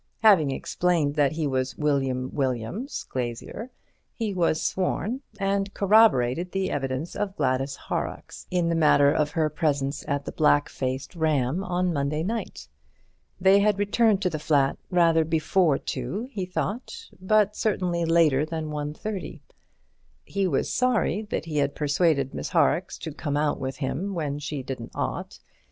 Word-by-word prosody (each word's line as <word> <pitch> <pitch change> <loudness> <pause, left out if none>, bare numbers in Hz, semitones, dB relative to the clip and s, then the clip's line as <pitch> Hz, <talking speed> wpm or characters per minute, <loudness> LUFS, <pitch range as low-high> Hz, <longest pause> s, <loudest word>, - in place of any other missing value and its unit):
Having 190 -10 +6
explained 160 +1 0
that 145 -2 +2
he 160 -1 -2
was 130 -2 -1
William 135 -4 0
Williams, 135 - -2
glazier, 125 - -5 0.5
he 220 -3 -2
was 170 -3 +1
sworn, 210 +7 -1 0.2
and 195 0 0
corroborated 180 - +4
the 195 -1 -1
evidence 135 +3 -3
of 195 -2 -3
Gladys 135 +2 0
Horrocks - - -5
in 175 -2 +1
the - - +1
matter 150 -3 +5
of 150 0 +1
her 155 -1 +3
presence 145 -3 -1
at 140 0 -1
the - - -4
"Black 145 -2 +3
Faced 130 +5 -4
Ram" 155 0 +1
on 180 -1 0
the - - -1
Monday 145 +2 -1
night. 225 +5 -4 0.7
They 190 +2 +6
had 205 0 +3
returned 205 0 +2
to 180 - +2
the 155 - -3
flat 140 -3 +2
rather 165 -2 +4
before 160 0 +2
two, 155 - -4
he 190 -7 -4
thought, 245 - -4
but 210 +1 +3
certainly 180 -5 0
later 165 -4 +4
than 155 -1 -4
1:30. 150 +7 -5 0.8
He 195 -1 -1
was 145 -7 0
sorry 235 -6 +1
that - - -2
he 155 -2 -4
had 140 -1 +1
persuaded 145 -2 +1
Miss - - -4
Horrocks - - +1
to - - -6
come 145 0 -2
out 150 0 0
with 130 0 -4
him 175 +8 -3
when 145 -3 -2
she 145 -2 -4
didn't 125 -3 -6
ought. - - -3
160 Hz, 155 wpm, -26 LUFS, 140-195 Hz, 0.8 s, Having